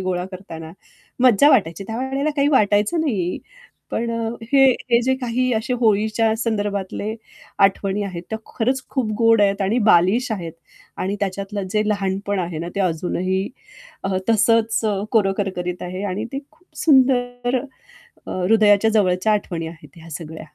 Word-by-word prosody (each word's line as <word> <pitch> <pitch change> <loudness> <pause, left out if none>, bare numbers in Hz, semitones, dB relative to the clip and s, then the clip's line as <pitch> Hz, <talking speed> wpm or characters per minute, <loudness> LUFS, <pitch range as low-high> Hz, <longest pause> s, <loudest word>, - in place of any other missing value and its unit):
गोळा 185 -1 -2
करताना 165 -4 -9 0.5
मज्जा 255 +2 +6
वाटायची. 195 - +2
त्यावेळेला 265 +7 -2
काही 280 0 +3
वाटायचं 210 +3 +2
नाही. 200 - -1 0.5
पण 235 0 -2
अ, 230 -1 -2 0.2
हे 270 -1 +6 0.3
हे 235 0 +5
जे 260 +2 +2
काही 250 +1 0
असे 225 +4 -1
होळीच्या 220 0 +2
संदर्भातले 205 -2 -2 0.5
आठवणी 195 +1 +1
आहेत, 180 -4 -6
त्या 220 - -2 0.2
खरंच 255 +3 0
खूप 255 -6 -1
गोड 225 -2 +5
आहेत 200 0 +2
आणि 210 +6 +1
बालिश 200 +9 +4
आहेत 170 -6 -5 0.5
आणि 195 +2 -2
त्याच्यातलं 200 0 -3
जे 210 -1 +2
लहानपण 200 -1 -1
आहे 170 -2 -4
ना 170 +2 -4
ते - - 0
अजूनही 185 +2 -1 0.6
अ, 195 -1 0
तसंच 225 0 +3 0.3
कोरं 205 -4 +3
करकरीत 180 -3 -3
आहे 185 +2 -5
आणि 205 +4 -3
ते 270 - -2
खूप 360 - -30 0.2
सुंदर 250 -3 +3 0.7
अ, - - -5
हृदयाच्या 210 +1 +4
जवळच्या 200 0 +2
आठवणी 170 -5 -2
आहेत 165 +1 -13
ह्या 165 +1 -13
सगळ्या. 160 +1 -7
205 Hz, 150 wpm, -21 LUFS, 185-235 Hz, 0.7 s, मज्जा